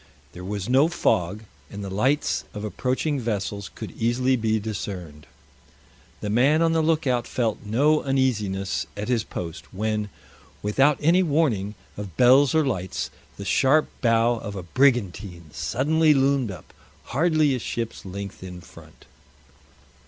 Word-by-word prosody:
There 90 Hz, -, -10 dB
was 100 Hz, +1 st, -4 dB
no 135 Hz, +5 st, +4 dB
fog, 105 Hz, -, 0 dB, 0.3 s
and 100 Hz, 0 st, -7 dB
the 100 Hz, -, -5 dB
lights 130 Hz, +10 st, +1 dB
of 105 Hz, -, -5 dB
approaching 130 Hz, +7 st, -1 dB
vessels 100 Hz, -3 st, -3 dB
could -, -, -7 dB
easily 125 Hz, +3 st, +1 dB
be 110 Hz, -2 st, 0 dB
discerned. 90 Hz, -8 st, -6 dB, 0.9 s
The 105 Hz, -, -3 dB
man 140 Hz, +8 st, +4 dB
on 165 Hz, -, +3 dB
the 165 Hz, 0 st, +2 dB
lookout 150 Hz, -7 st, +1 dB
felt 115 Hz, -4 st, -1 dB
no 140 Hz, +9 st, +2 dB
uneasiness 110 Hz, -8 st, 0 dB
at 105 Hz, +3 st, -4 dB
his 120 Hz, -3 st, +1 dB
post, 85 Hz, -6 st, -7 dB
when, 105 Hz, +1 st, -2 dB, 0.5 s
without 135 Hz, +8 st, +3 dB
any 170 Hz, +5 st, +4 dB
warning 140 Hz, -, +1 dB, 0.2 s
of 100 Hz, -5 st, -7 dB
bells 130 Hz, +3 st, +6 dB
or 160 Hz, -1 st, +4 dB
lights, 95 Hz, -8 st, -3 dB, 0.3 s
the 100 Hz, -, -7 dB
sharp 140 Hz, +9 st, +3 dB
bow 115 Hz, 0 st, +3 dB
of 100 Hz, -1 st, -6 dB
a 95 Hz, -, -5 dB
brigantine 95 Hz, -, 0 dB
suddenly 155 Hz, +4 st, +2 dB
loomed 135 Hz, -3 st, +2 dB
up, 95 Hz, -, -10 dB, 0.4 s
hardly 155 Hz, 0 st, +3 dB
a 130 Hz, -, -1 dB
ship's 115 Hz, 0 st, -4 dB
length 100 Hz, +1 st, -7 dB
in 90 Hz, -1 st, -8 dB
front. 85 Hz, -, -16 dB
115 Hz, 145 wpm, -24 LUFS, 100-140 Hz, 0.9 s, bells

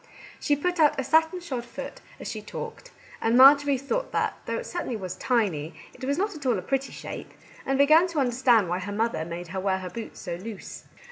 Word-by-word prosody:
She 290 Hz, -, +2 dB
put 355 Hz, +5 st, -2 dB
out 300 Hz, -2 st, +4 dB
a -, -, 0 dB
satin 320 Hz, +5 st, +2 dB
shod 260 Hz, -8 st, -4 dB
foot 240 Hz, -, -8 dB, 0.2 s
as -, -, -7 dB
she -, -, -5 dB
talked, -, -, -8 dB, 0.3 s
and 230 Hz, +2 st, +3 dB
Marjorie 280 Hz, +1 st, +7 dB
thought 480 Hz, -, -2 dB
that, -, -, 0 dB
though -, -, -1 dB
it -, -, -5 dB
certainly 345 Hz, -8 st, -3 dB
was 185 Hz, -4 st, -5 dB
tiny, 185 Hz, -, 0 dB, 0.2 s
it -, -, -14 dB
was 280 Hz, +2 st, 0 dB
not 405 Hz, +3 st, 0 dB
at 300 Hz, -, -9 dB
all 240 Hz, -4 st, +3 dB
a -, -, -3 dB
pretty 270 Hz, 0 st, -1 dB
shape, -, -, -8 dB, 0.4 s
and 270 Hz, 0 st, +1 dB
began 310 Hz, +5 st, +6 dB
to 335 Hz, -4 st, -2 dB
understand 245 Hz, -5 st, +3 dB
why 175 Hz, +2 st, -1 dB
her 200 Hz, +2 st, -5 dB
mother 220 Hz, -5 st, 0 dB
made 170 Hz, +1 st, -6 dB
her 190 Hz, +2 st, -3 dB
wear 190 Hz, 0 st, +1 dB
her 185 Hz, -1 st, -6 dB
boots 230 Hz, -1 st, -7 dB
so 170 Hz, -1 st, -5 dB
loose. 205 Hz, +2 st, -8 dB
255 Hz, 220 wpm, -26 LUFS, 200-300 Hz, 0.4 s, Marjorie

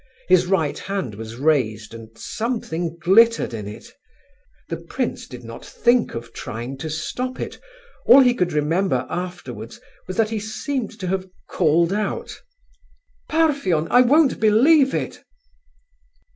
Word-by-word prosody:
His 180 Hz, -1 st, +4 dB
right 165 Hz, -6 st, 0 dB
hand 195 Hz, -, -4 dB
was 110 Hz, +2 st, -8 dB
raised, 120 Hz, -7 st, 0 dB
and 115 Hz, -1 st, -10 dB
something 175 Hz, -8 st, -3 dB
glittered 210 Hz, -, +4 dB
in 105 Hz, -3 st, -5 dB
it. 105 Hz, -, -10 dB, 0.7 s
The -, -, -4 dB
prince -, -, -4 dB
did 125 Hz, -1 st, -10 dB
not 115 Hz, 0 st, -9 dB
think 240 Hz, 0 st, +1 dB
of 115 Hz, 0 st, -7 dB
trying 125 Hz, +2 st, -6 dB
to 160 Hz, -, -4 dB
stop 250 Hz, +11 st, -4 dB
it. -, -, -6 dB, 0.5 s
All 275 Hz, -, +9 dB
he 250 Hz, -2 st, +5 dB
could 180 Hz, -7 st, 0 dB
remember 160 Hz, +6 st, 0 dB
afterwards 130 Hz, -, -6 dB, 0.3 s
was 185 Hz, -, -5 dB
that 225 Hz, -1 st, +2 dB
he 220 Hz, -, -1 dB
seemed 220 Hz, +1 st, -4 dB
to -, -, -3 dB
have 190 Hz, 0 st, -2 dB, 0.2 s
called 170 Hz, +1 st, +2 dB
out: 210 Hz, +1 st, -3 dB, 0.9 s
"Parfen! 280 Hz, -, +1 dB
I 245 Hz, -, +7 dB
won't 280 Hz, +3 st, +4 dB
believe 265 Hz, +7 st, +4 dB
it." -, -, -4 dB
180 Hz, 140 wpm, -22 LUFS, -, 0.9 s, All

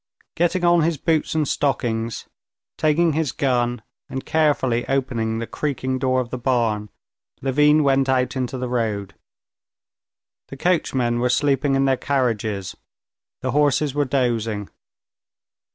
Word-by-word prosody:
Getting 175 Hz, +2 st, 0 dB
on 175 Hz, -1 st, +5 dB
his 160 Hz, 0 st, +1 dB
boots 160 Hz, +1 st, 0 dB
and 155 Hz, -2 st, +1 dB
stockings, 115 Hz, -6 st, -1 dB, 0.5 s
taking 160 Hz, +1 st, +2 dB
his 155 Hz, -2 st, 0 dB
gun, 120 Hz, -4 st, 0 dB, 0.3 s
and 135 Hz, -, -5 dB
carefully 140 Hz, -6 st, +1 dB
opening 125 Hz, -5 st, -1 dB
the 115 Hz, -, -3 dB
creaking 130 Hz, -1 st, -3 dB
door 130 Hz, 0 st, +1 dB
of 125 Hz, -2 st, -4 dB
the 130 Hz, -, -4 dB
barn, 115 Hz, -4 st, 0 dB, 0.5 s
Levin 150 Hz, +3 st, +4 dB
went 135 Hz, -1 st, +2 dB
out 130 Hz, 0 st, +1 dB
into 130 Hz, 0 st, -2 dB
the 125 Hz, 0 st, -3 dB
road. 110 Hz, -5 st, -2 dB, 1.3 s
The 135 Hz, -, -9 dB
coachmen 130 Hz, -8 st, +1 dB
were 125 Hz, +1 st, +1 dB
sleeping 135 Hz, +1 st, +2 dB
in 135 Hz, 0 st, +2 dB
their 135 Hz, -1 st, +2 dB
carriages, 110 Hz, -9 st, -1 dB, 0.7 s
the 130 Hz, -, -1 dB
horses 145 Hz, 0 st, +2 dB
were 145 Hz, 0 st, +1 dB
dozing. 115 Hz, -6 st, -1 dB
130 Hz, 135 wpm, -22 LUFS, 120-145 Hz, 1.3 s, on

